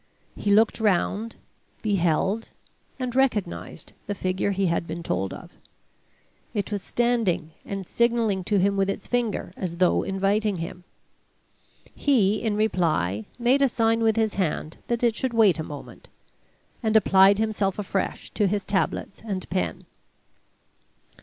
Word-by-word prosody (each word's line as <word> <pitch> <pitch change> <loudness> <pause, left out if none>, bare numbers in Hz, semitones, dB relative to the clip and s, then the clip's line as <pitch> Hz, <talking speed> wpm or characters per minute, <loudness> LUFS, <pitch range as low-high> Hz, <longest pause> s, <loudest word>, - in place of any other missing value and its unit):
He 205 - -3
looked 215 +3 +4
round, 210 +2 0 0.5
beheld 195 +2 +1 0.5
and 255 -2 -4
recognized 215 - -1
the 205 - -2
figure 185 +1 -1
he 195 0 0
had 170 -1 0
been 170 - -5
told 95 - -1
of. - - -10 1.0
It 205 0 -2
was 205 -1 -2
standing 220 -11 0
and 195 -1 -5
signaling 230 -3 +1
to 205 - +2
him 200 +1 +2
with 195 0 +2
its 195 - -3
finger, 235 -7 -1
as 175 -3 -4
though 180 0 +3
inviting 200 +1 0
him. 170 +2 -7 1.1
He, 215 -7 +2
in 220 -3 0
reply, 155 - 0
made 250 +3 +3
a 275 - +5
sign 225 -1 +2
with 220 -1 +3
his 220 -2 +1
hand 160 -4 -2
that 235 0 -1
it 235 -2 +3
should 255 +1 -2
wait 210 -7 +5
a - - -1
moment, 145 -2 -10 0.7
and 220 -2 +3
applied 195 -1 +6
himself 210 -3 0
afresh 195 -2 -3
to 205 - +1
his 200 +1 -1
tablets 195 0 -2
and 195 -5 -4
pen. 185 +1 -2
200 Hz, 145 wpm, -25 LUFS, 185-225 Hz, 1.1 s, applied